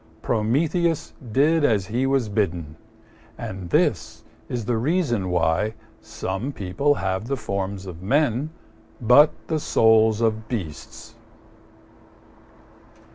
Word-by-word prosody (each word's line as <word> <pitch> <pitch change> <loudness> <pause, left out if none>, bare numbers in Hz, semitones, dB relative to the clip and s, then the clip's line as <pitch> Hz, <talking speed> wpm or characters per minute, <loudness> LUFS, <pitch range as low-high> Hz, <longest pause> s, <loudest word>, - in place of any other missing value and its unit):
Prometheus 155 - 0 0.2
did 150 +6 +3
as 105 -8 +2
he 120 +6 -1
was 135 -4 +1
bidden, 90 -7 -2 0.6
and 95 -2 -6
this - - 0 0.3
is 120 -3 -3
the 120 0 0
reason 120 - 0
why 90 +5 +1 0.3
some 95 +9 -4
people 140 +7 0
have 95 +1 -2
the 140 +1 -1
forms 100 -3 -4
of 90 -2 -9
men 135 +5 +1 0.5
but 125 +6 +6 0.2
the 160 -1 0
souls 110 -4 +4
of 110 -1 0
beasts. 95 -12 -6
110 Hz, 110 wpm, -23 LUFS, 95-140 Hz, 0.6 s, but